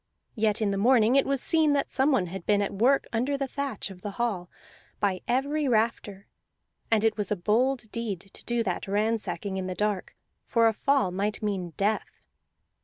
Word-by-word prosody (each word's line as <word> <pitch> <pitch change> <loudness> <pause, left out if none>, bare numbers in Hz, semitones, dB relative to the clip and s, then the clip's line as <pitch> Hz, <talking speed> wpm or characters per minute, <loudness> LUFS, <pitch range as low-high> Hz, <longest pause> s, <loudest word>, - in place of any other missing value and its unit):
Yet 220 -1 +1
in 200 - +1
the 195 - -1
morning 240 +1 +4
it 275 - +4
was 275 -1 0
seen 315 -3 +4
that 280 -1 0
someone 265 -7 +2
had 180 +1 -7
been 205 -1 +3
at 200 - -3
work 250 +7 +3
under 255 +5 0
the 275 -1 -2
thatch 270 -7 -4
of 180 -1 -12
the 205 - -4
hall, 200 -7 -2 0.5
by 195 -3 0
every 280 +4 0
rafter; 215 -4 0 0.6
and 220 -2 +3
it 225 -1 +2
was 210 0 -2
a - - +3
bold 220 +5 0
deed 215 -6 -3
to 195 - -13
do 235 -1 0
that 185 -3 -3
ransacking 205 -2 -1
in 185 -1 -3
the 185 - -4
dark, 210 -2 -2 0.3
for 230 -2 +4
a 225 - +2
fall 275 -5 +1
might 205 +4 -2
mean 190 -5 -2
death. 210 +2 -1
215 Hz, 190 wpm, -27 LUFS, 195-250 Hz, 0.6 s, morning